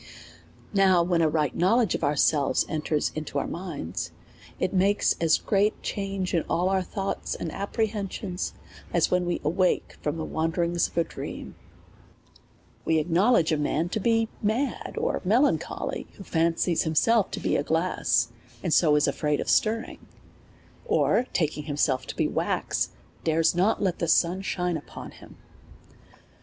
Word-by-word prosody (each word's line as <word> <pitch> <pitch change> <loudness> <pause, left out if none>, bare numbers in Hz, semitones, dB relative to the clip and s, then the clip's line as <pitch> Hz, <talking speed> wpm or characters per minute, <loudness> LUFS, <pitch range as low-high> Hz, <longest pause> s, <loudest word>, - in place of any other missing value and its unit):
Now 190 -3 +5
when 170 -1 +1
a 160 - +3
ri^ht 150 -3 0
knowledge 220 +4 +2
of - - -3
ourselves 145 0 +2
enters 155 -1 -1
into 155 -2 -4
our 140 - 0
mind.«t, 160 - -5 0.5
it 185 - -1
makes 195 +2 +3
as 165 -1 +4
great 205 +1 +1
a - - -26
change 195 -2 -3
in 170 - +3
all 175 +2 +1
our 190 -1 +2
thoughts 195 +2 -3
and 165 - -5
apprehensions, 200 -2 -3 0.4
as 170 -2 +2
when 180 -1 +1
wc 175 - -2
awake 180 +5 0
from 150 +2 -2
the 160 - -3
wanderings 170 +1 0
of - - -18
a 170 - +4
dream. - - -7 1.3
We 160 - +2
acknowledge 170 +3 +3
a 155 - +2
man 155 +3 0
to 215 - -2
be 225 +1 +2
mad 225 +7 -1
or 470 +2 -1
melancholy, 235 +10 0
who 200 - -11
fancies 165 0 +1
himself 195 +7 +2
to - - -5
be - - 0
glass, 160 -7 +1 0.3
and 165 - 0
so 155 -4 +5
is 150 - +3
afraid 150 -1 0
of - - 0
stirring; 225 +2 +1 0.8
or, 430 - +2
taking 150 -3 -1
himself 145 -3 0
to - - -6
be - - +1
wax, - - -1 0.3
dare 165 0 +1
not 190 +5 +1
let 185 -3 0
the 170 - -1
sun 175 +3 +3
shine 180 -3 -1
upon 150 - -9
him. - - -15
175 Hz, 155 wpm, -26 LUFS, 160-195 Hz, 1.3 s, Now